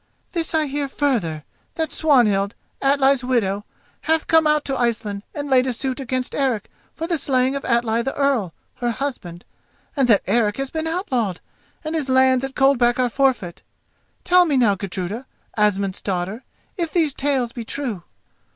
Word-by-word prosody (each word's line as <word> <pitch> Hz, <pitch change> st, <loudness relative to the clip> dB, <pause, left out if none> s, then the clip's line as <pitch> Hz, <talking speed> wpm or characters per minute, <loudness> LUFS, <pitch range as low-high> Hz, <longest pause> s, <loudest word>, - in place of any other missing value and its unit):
This 330 Hz, -2 st, -2 dB
I 310 Hz, -1 st, +2 dB
hear, 285 Hz, 0 st, -2 dB
further: 225 Hz, -, -1 dB, 0.3 s
that 320 Hz, -2 st, -2 dB
Swanhild, 230 Hz, -10 st, +3 dB, 0.3 s
Atli's 275 Hz, -1 st, +3 dB
widow, 210 Hz, -5 st, 0 dB, 0.4 s
hath 320 Hz, 0 st, +1 dB
come 320 Hz, -1 st, +4 dB
out 300 Hz, -1 st, +2 dB
to 270 Hz, -, -1 dB
Iceland 220 Hz, -4 st, -1 dB
and 290 Hz, -1 st, -4 dB
laid 260 Hz, -1 st, +3 dB
a 255 Hz, -, 0 dB
suit 260 Hz, +3 st, -3 dB
against 255 Hz, -1 st, -3 dB
Eric 260 Hz, -6 st, -1 dB, 0.2 s
for 325 Hz, -, -3 dB
the 335 Hz, -2 st, -1 dB
slaying 260 Hz, 0 st, +1 dB
of 275 Hz, -, -3 dB
Atli 235 Hz, -1 st, +1 dB
the 270 Hz, +3 st, -3 dB
Earl, 270 Hz, -10 st, +1 dB, 0.3 s
her 240 Hz, -, -1 dB
husband, 230 Hz, -9 st, -5 dB, 0.5 s
and 270 Hz, -4 st, +2 dB
that 215 Hz, -5 st, +4 dB
Eric 210 Hz, 0 st, +1 dB
has 275 Hz, -1 st, -3 dB
been 320 Hz, 0 st, -2 dB
outlawed 255 Hz, -, -1 dB, 0.4 s
and 310 Hz, 0 st, -4 dB
his 300 Hz, -5 st, -2 dB
lands 260 Hz, 0 st, +4 dB
at 270 Hz, 0 st, -5 dB
Coldback 245 Hz, -3 st, +3 dB
are 250 Hz, -1 st, +2 dB
forfeit. 225 Hz, -9 st, 0 dB, 0.6 s
Tell 360 Hz, 0 st, +5 dB
me 290 Hz, -5 st, +1 dB
now, 230 Hz, -5 st, +4 dB
Gudruda, 195 Hz, +5 st, -5 dB, 0.3 s
Asmund's 200 Hz, -2 st, +1 dB
daughter, 195 Hz, +5 st, -3 dB, 0.3 s
if 335 Hz, -3 st, -2 dB
these 320 Hz, -5 st, +2 dB
tales 265 Hz, -4 st, 0 dB
be 235 Hz, -1 st, -6 dB
true?" 230 Hz, -5 st, -4 dB
255 Hz, 170 wpm, -21 LUFS, 215-285 Hz, 0.6 s, Tell